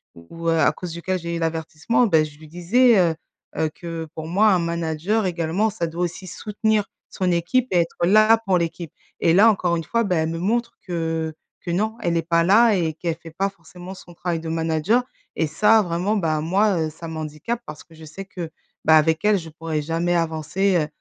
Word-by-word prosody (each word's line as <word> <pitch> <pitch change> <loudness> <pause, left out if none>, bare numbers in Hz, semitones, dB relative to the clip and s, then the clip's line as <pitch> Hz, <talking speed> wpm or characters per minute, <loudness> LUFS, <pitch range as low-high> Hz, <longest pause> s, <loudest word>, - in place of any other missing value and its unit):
où, 165 - -8
heu, 165 - +2
à - - +4
cause 180 -2 -7
duquel 185 +2 -2
j'ai 170 0 -4
eu - - -3
l'avertissement, 165 +8 0
bah 160 -4 +4
je 150 -1 -8
lui 155 - -13
disais, 210 +8 +3
heu 170 -3 +3 0.4
heu, 155 - +1
que 165 -1 -6
pour 160 0 -6
moi: 205 +6 +3
«Un 180 - +2
manager 170 +5 -1
également 175 +4 0
ça 200 -5 -3
doit 170 +2 -3
aussi 175 +2 -7
soutenir 210 +2 -1 0.2
son 185 -1 -1
équipe 175 +10 +1
et 180 - +3
être 170 0 -1
là 215 +4 +6
pour 185 -2 +3
l'équipe» 170 -1 -3 0.3
et 165 -1 +3
là, 215 +5 +7
encore 180 -4 0
une 165 - -3
fois, 230 +8 0
bah 185 - 0
elle 160 -1 0
me 165 0 -4
montre 235 +5 -1
que 165 -3 -3 0.2
que 175 - -5
non, 215 +5 -1
elle 170 -1 0
est 165 - +2
pas 170 0 +2
là 220 +3 +5
et 160 -3 -1
qu'elle 165 0 -3
fait 165 -1 -11
pas 195 +1 +1
forcément 180 0 -12
son 175 -2 -13
travail 170 -1 -3
de 160 - -8
manager 165 +8 +1 0.3
et 160 - +1
ça 215 +8 +4
vraiment, 180 +3 -1
bah 160 -6 0
moi, 185 +2 +1
heu, - - -5
ça 160 +1 -9
m'handicape 155 +8 -4
parce 150 0 -9
que 165 - -21
je 160 0 -12
sais 175 +6 -8
que, 175 -4 -7 0.4
bah 160 - +6
avec 160 +3 +2
elle, 210 -1 +4
je 165 -2 -7
pourrais 160 -1 -4
jamais 165 +3 -1
avancer, 170 +4 0
heu 150 -3 0
170 Hz, 220 wpm, -22 LUFS, 160-195 Hz, 0.4 s, là